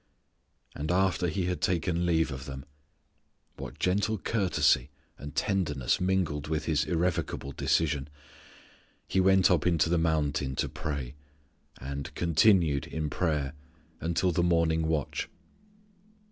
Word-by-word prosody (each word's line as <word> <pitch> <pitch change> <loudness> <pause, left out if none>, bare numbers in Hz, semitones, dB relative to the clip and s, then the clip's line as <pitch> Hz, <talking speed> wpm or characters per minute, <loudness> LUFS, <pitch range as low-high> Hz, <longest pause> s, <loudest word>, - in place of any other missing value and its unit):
"And 75 +3 -3
after 95 -1 +2
He 90 +2 -1
had 90 0 -2
taken 85 0 0
leave 80 -2 +2
of 65 +1 -6
them" 65 0 -7 0.9
what - - -8
gentle 105 +4 +1
courtesy 90 -8 +2 0.3
and 75 +1 -8
tenderness 75 - 0
mingled 90 -6 0
with 75 -1 -2
His 80 -3 +1
irrevocable 85 -5 -1
decision 75 -1 0 1.0
"He 95 - +1
went 95 -1 +5
up 90 -1 +2
in 85 -2 +3
the 80 +2 +2
mountain 75 -4 0
to - - 0
pray," 70 -4 -4 0.7
and 70 +2 -5
"continued 85 - +3
in 75 -2 -3
prayer" 75 -6 -1 0.5
until 85 +2 0
the 85 - +1
morning 85 -2 +2
watch. 80 -3 -2
80 Hz, 125 wpm, -29 LUFS, 75-90 Hz, 1.0 s, went